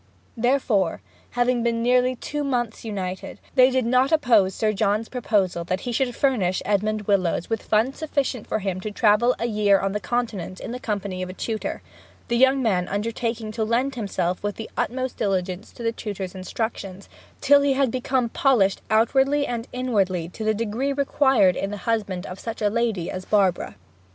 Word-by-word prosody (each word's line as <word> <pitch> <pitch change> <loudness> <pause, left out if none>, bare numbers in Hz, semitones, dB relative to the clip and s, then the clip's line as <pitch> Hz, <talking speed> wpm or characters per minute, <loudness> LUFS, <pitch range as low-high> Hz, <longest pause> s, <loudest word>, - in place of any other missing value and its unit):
Therefore, 230 -7 +1 0.4
having 245 0 +2
been 230 0 0
nearly 250 +1 +3
two 295 +4 -4
months 240 -5 -2
united, 190 -4 -5
they 255 -1 +6
did 260 -2 0
not 255 +4 +3
oppose 230 - +3
Sir 215 -1 +1
John's 210 +2 0
proposal 200 -8 0
that 185 +2 -2
he 245 - -4
should 245 0 0
furnish 210 -10 +1
Edmond 210 +1 0
Willowes 185 -2 0
with 225 - 0
funds 225 +5 +1
sufficient 280 -6 -2
for - - 0
him 190 -3 -3
to 215 - -4
travel 215 +3 +3
a - - -2
year 210 -3 +3
on 195 - -1
the 210 - -2
Continent 210 -7 -3
in - - -6
the 250 - -5
company 200 -5 -3
of 185 - -4
a - - -6
tutor, 220 +3 -4 0.5
the 235 - +1
young 265 +1 +4
man 185 -6 +1
undertaking 225 +2 -3
to 220 +1 -2
lend 240 +5 0
himself 185 -6 -2
with 205 0 -2
the 225 - -8
utmost 255 +1 -2
diligence 190 -1 -2
to 235 - -9
the 230 - +1
tutor's 200 -5 -5
instructions, 195 0 -5 0.3
till 285 0 +5
he 275 -1 +3
became 255 0 0
polished 225 -6 +2
outwardly 265 +6 +3
and 235 -2 -4
inwardly 195 -9 0
to 220 - -7
the 215 0 +1
degree 230 +5 -1
required 265 -8 +3
in 195 - -2
the 205 - -5
husband 205 -6 -1
of 185 +1 -8
such 225 -1 -6
a 210 -1 +1
lady 225 -6 -1
as 185 - -5
Barbara. 190 - +1
220 Hz, 180 wpm, -24 LUFS, 195-250 Hz, 0.5 s, they